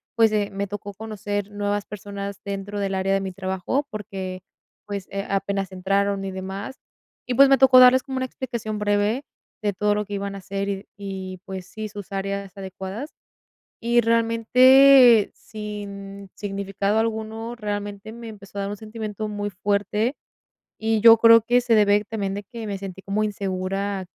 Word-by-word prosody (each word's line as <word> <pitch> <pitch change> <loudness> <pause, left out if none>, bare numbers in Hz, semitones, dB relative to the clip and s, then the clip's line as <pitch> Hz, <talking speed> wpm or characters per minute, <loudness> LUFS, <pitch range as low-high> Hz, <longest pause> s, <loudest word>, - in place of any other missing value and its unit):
pues, 225 -2 +4
eh, 205 -1 0
me 200 +1 -2
tocó 205 0 -7
conocer 205 -1 -4
nuevas 205 0 -2
personas 200 -1 -7
dentro 200 +1 -4
del 195 -1 -1
área 190 +1 +1
de 195 - +2
mi 190 -1 -5
trabajo, 190 +9 -2
porque, 190 -3 -6 0.5
pues, 200 -2 -5
eh, 195 0 -3
apenas 195 0 -1
entraron 195 +1 0
y 195 - -4
demás. 190 +7 -6 0.5
Y, 250 - -1
pues, 275 +1 +7
me 270 - +5
tocó 265 -1 +8
darles 255 +1 +8
como 265 0 -5
una 260 - 0
explicación 235 -5 -5
breve 205 +5 +1 0.4
de 205 -2 0
todo 210 +2 +1
lo 210 0 -1
que 205 - -8
iban 200 0 -3
a 195 - -7
hacer, 195 +1 -4
y 200 - 0
de 195 - -14
y, 190 -2 -6
pues, 190 -1 -7
sí, 215 0 -6
sus 205 0 -9
áreas 195 0 -4
adecuadas. 190 +8 -6 0.7
Y, 240 +1 +3
realmente, 235 +1 +6
sin 200 -2 -8
significado 200 +1 -2
alguno, 225 +1 -2
realmente, 205 -1 -5
me 235 0 -9
empezó 200 -2 -10
a - - -1
dar 200 - -3
un 205 - -4
sentimiento 215 -1 -5
muy 205 0 -3
fuerte, 205 +6 0 0.7
y 220 0 +1
yo 230 0 +9
creo 230 0 +8
que 245 +3 +3
se 240 -2 +3
debe 205 -1 +4
también 200 -3 -3
de 205 +1 -5
que 230 +1 -8
me 200 -2 -3
sentí 190 -1 -7
como 205 +2 0
insegura 195 -1 -2
205 Hz, 175 wpm, -23 LUFS, 195-220 Hz, 0.7 s, yo